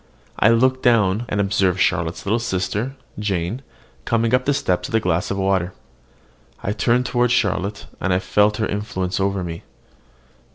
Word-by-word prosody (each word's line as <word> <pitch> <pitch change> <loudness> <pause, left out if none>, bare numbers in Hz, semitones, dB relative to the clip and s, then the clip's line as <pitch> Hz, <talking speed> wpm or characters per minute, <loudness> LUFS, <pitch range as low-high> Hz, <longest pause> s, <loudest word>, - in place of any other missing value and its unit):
I 110 - +5
looked 130 +3 +3
down, 110 -2 +3
and 100 - -1
observed 95 -2 +1
Charlotte's 85 -2 0
little 110 +4 +1
sister, 115 +3 -2 0.2
Jane, 100 +3 -2 0.4
coming 115 0 +1
up 125 0 +3
the 145 - +2
steps 90 -8 -1
with - - -2
a - - +5
glass 90 -2 0
of 100 - -2
water. 95 -2 0 0.9
I 100 - -1
turned 120 +4 +1
toward 125 0 +1
Charlotte, 105 -3 0
and 95 - -1
I 90 - +3
felt 105 +2 +2
her 110 - 0
influence 100 -3 -3
over 100 -1 0
me. 85 -1 -6
100 Hz, 165 wpm, -21 LUFS, 95-115 Hz, 0.9 s, I